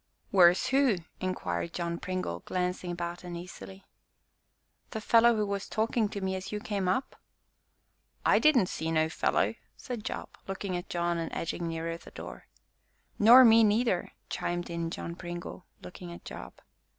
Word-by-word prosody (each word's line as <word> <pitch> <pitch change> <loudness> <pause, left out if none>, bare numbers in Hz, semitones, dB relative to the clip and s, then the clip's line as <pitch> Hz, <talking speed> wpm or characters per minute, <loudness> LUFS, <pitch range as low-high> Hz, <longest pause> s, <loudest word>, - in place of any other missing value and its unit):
"Where's 180 -2 +6
who?" 270 -4 +4 0.2
inquired 170 - -3
John 170 -1 -2
Pringle, 185 - -3
glancing 180 - -2
about 175 0 -5
uneasily. 180 +2 -9 1.0
"The 220 - -4
fellow 230 +1 +5
who 210 -1 +1
was 200 -1 -3
talking 220 0 0
to 200 - -5
me 190 0 -1
as 190 +1 -6
you 210 - -2
came 200 -3 -2
up?" 190 +9 -1 1.1
"I - - +5
didn't 300 -9 +5
see 160 -2 -3
no 160 0 +2
fellow!" - - +1 0.2
said 240 -5 -6
Job, - - -5 0.2
looking 195 -1 -3
at 175 - -5
John 170 -1 0
and 165 - -4
edging 170 +1 -3
nearer 165 0 -3
the - - -14
door. - - -10 0.7
"Nor 240 +5 +9
me 225 0 +7
neither!" 215 -3 +1
chimed 175 0 -3
in 170 -1 -2
John 170 0 -5
Pringle, 175 0 -7 0.2
looking 180 -1 -9
at 170 - -11
Job. - - -8
185 Hz, 155 wpm, -29 LUFS, 170-210 Hz, 1.1 s, Nor